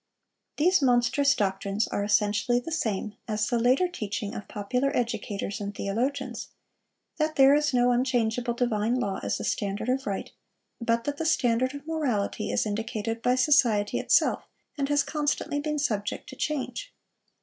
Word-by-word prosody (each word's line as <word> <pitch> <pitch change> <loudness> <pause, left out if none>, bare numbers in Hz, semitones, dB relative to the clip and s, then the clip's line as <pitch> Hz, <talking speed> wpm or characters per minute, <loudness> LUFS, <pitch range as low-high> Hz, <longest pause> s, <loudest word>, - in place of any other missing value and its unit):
These 360 +3 +4
monstrous 265 +2 +3
doctrines 195 +1 -1
are 200 - -1
essentially 210 +3 +2
the 285 +7 -7
same 220 -9 -2
as 215 -1 0
the 240 +1 0
later 255 +9 +3
teaching 210 - -4
of 215 -4 -7
popular 250 +6 -1
educators 215 -3 -3
and 205 0 -5
theologians,—that 265 +6 -4
there 270 0 +7
is 295 0 +2
no 245 -1 +3
unchangeable 240 -1 0
divine 235 -1 0
law 200 -5 -2
as - - -1
the - - -6
standard 205 +3 -2
of 265 0 0
right, 195 -1 -3 0.5
but 230 0 +1
that 290 +2 -3
the 325 - -3
standard 255 -3 +2
of 285 0 -9
morality 285 -11 -1
is - - +1
indicated 225 +1 -3
by 250 +1 +2
society 245 -7 +3
itself, - - +2 0.3
and 280 -1 -2
has 290 -1 +3
constantly 295 -1 -1
been 300 0 -2
subject 210 -8 -2
to - - -9
change. 305 - -3
240 Hz, 155 wpm, -27 LUFS, 210-280 Hz, 0.5 s, there